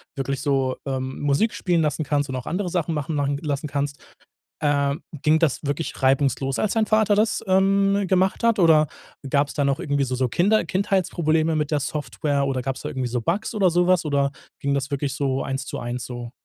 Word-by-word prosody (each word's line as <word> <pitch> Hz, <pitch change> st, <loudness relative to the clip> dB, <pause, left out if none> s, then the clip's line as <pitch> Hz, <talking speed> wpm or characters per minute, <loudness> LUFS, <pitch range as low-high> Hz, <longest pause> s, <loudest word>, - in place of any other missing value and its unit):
wirklich 135 Hz, 0 st, -2 dB
so, 135 Hz, -3 st, +1 dB
ähm, 130 Hz, -1 st, -3 dB
Musik 145 Hz, +10 st, +1 dB
spielen 175 Hz, -3 st, +1 dB
lassen 150 Hz, 0 st, 0 dB
kannst 145 Hz, -1 st, 0 dB
und 130 Hz, -, -3 dB
auch 125 Hz, -, -5 dB
andere 180 Hz, +1 st, -2 dB
Sachen 170 Hz, -2 st, -1 dB
machen 150 Hz, +1 st, -3 dB
machen 140 Hz, -1 st, 0 dB
lassen 145 Hz, -2 st, -3 dB
kannst. 140 Hz, 0 st, -3 dB, 0.6 s
Ähm, 145 Hz, +1 st, +1 dB, 0.2 s
ging 155 Hz, +1 st, +4 dB
das 160 Hz, -5 st, +1 dB
wirklich 145 Hz, +3 st, -3 dB
reibungslos, 135 Hz, 0 st, +2 dB
als 215 Hz, -, +1 dB
dein 220 Hz, -1 st, +2 dB
Vater 215 Hz, -1 st, +3 dB
das, 215 Hz, +2 st, +1 dB
ähm, 195 Hz, +1 st, +3 dB
gemacht 190 Hz, +3 st, +2 dB
hat? 230 Hz, -2 st, +3 dB
Oder 160 Hz, -4 st, +5 dB, 0.4 s
gab's 140 Hz, +1 st, +1 dB
da 145 Hz, -, 0 dB
noch 140 Hz, +2 st, +1 dB
irgendwie 145 Hz, -5 st, 0 dB
so 130 Hz, -1 st, -3 dB
so 130 Hz, 0 st, +1 dB
Kinder 200 Hz, -, +2 dB
Kindheitsprobleme 165 Hz, -4 st, +1 dB
mit 150 Hz, -1 st, -1 dB
der 150 Hz, -2 st, +1 dB
Software? 145 Hz, 0 st, -2 dB
Oder 135 Hz, -2 st, -1 dB
gab's 135 Hz, 0 st, -4 dB
da 150 Hz, -, -4 dB
irgendwie 130 Hz, -4 st, -3 dB
so 120 Hz, 0 st, -2 dB
Bugs 185 Hz, -, -2 dB
oder 195 Hz, -4 st, +3 dB
so 175 Hz, +1 st, +2 dB
was? 185 Hz, -2 st, +3 dB
Oder 140 Hz, -2 st, +1 dB, 0.3 s
ging 140 Hz, 0 st, 0 dB
das 140 Hz, +1 st, -2 dB
wirklich 140 Hz, -1 st, -2 dB
so 135 Hz, -2 st, -1 dB
1 135 Hz, 0 st, -3 dB
zu -, -, -5 dB
1 120 Hz, 0 st, -4 dB
so? 120 Hz, -1 st, -7 dB
145 Hz, 210 wpm, -23 LUFS, 135-175 Hz, 0.6 s, Oder